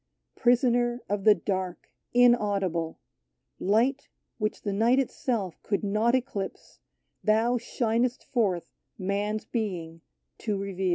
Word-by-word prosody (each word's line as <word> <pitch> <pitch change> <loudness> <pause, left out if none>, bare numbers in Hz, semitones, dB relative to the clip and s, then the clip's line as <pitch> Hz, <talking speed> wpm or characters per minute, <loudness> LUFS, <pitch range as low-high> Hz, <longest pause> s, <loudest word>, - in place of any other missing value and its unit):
Prisoner 240 0 +2
of 200 -1 -2
the 215 -1 +8
dark, 185 -1 -3 0.2
inaudible 200 -9 +2 0.4
— - - -51 0.2
Light, 265 +5 +1 0.3
which 215 -1 -2
the 205 - -1
night 230 +5 +3
itself 230 -8 -1
could 200 0 -1
not 215 +4 +2
eclipse, 245 -7 -4 0.4
Thou 225 +3 +3
shinest 235 +1 0
forth 200 -9 -1 0.2
Man's 205 +3 -1
being 175 -8 -4 0.4
to 210 -3 -1
reveal. 195 -1 -2
215 Hz, 115 wpm, -27 LUFS, 195-240 Hz, 0.4 s, the